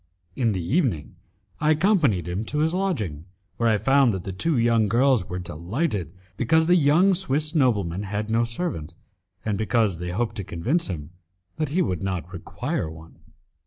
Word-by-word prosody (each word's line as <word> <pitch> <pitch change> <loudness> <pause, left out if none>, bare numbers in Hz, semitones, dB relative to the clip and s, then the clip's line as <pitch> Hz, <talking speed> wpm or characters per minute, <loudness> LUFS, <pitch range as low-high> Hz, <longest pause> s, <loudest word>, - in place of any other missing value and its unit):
In 115 -4 +1
the 90 -3 -3
evening 120 - 0 0.4
I 155 - +1
accompanied 155 - +3
him 90 +5 -2
to 150 - -3
his 160 +2 +2
lodging, 110 - -2 0.3
where 115 -1 +2
I 110 - +3
found 135 0 +3
that 95 -2 -4
the 95 - -5
two 155 - 0
young 115 -2 +3
girls 120 -2 +2
were 90 - -3
delighted 90 - -3 0.3
because 160 +7 +3
the 175 +2 +4
young 170 +5 +4
Swiss 155 -4 -1
nobleman 105 - +1
had 105 +1 -3
no 115 +1 +3
servant, 115 - -3 0.5
and 105 -2 -1
because 110 -5 +1
they 90 0 -4
hoped 110 +6 -2
to 100 - -3
convince 115 - -1
him 80 -5 -6 0.5
that 155 -3 -1
he 180 +5 +1
would 90 - -2
not 90 -2 -3
require 85 -2 -3
one. 80 +1 -13
115 Hz, 175 wpm, -24 LUFS, 90-150 Hz, 0.5 s, the